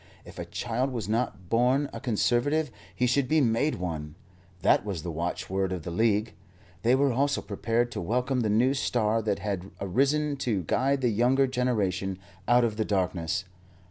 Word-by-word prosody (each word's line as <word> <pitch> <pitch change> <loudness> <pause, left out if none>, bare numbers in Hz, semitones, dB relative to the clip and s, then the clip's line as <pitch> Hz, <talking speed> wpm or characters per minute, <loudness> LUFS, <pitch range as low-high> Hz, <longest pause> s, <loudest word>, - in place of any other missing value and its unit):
If - - -11
a - - -4
child 120 +3 -2
was 120 -6 -4
not 110 -5 -2
born 125 +7 +2
a - - -5
Conservative, 125 +4 +1 0.2
he 125 - +1
should 130 +2 +2
be 155 +4 +3
made 130 +3 +2
one. 80 -4 -5 0.5
That 95 - +4
was 95 -7 -4
the 85 - -4
watchword 90 +3 -2
of 90 -3 -4
the 85 - -5
League. 110 +3 +1 0.5
They 120 +3 +4
were 140 -1 +2
also 140 +3 +1
prepared 115 +4 -1
to - - -4
welcome 125 +8 0
the 110 -3 +1
new 120 +6 +3
star 115 -5 +1
that 105 -2 0
had 100 -1 -4
arisen 140 +9 +1
to 110 -8 -1
guide 135 - +1
the 125 - +2
younger 125 +5 +3
generation 105 -8 -1 0.3
out 120 0 +5
of 110 -3 0
the 110 - +1
darkness. 90 -5 -1
115 Hz, 175 wpm, -27 LUFS, 95-130 Hz, 0.5 s, out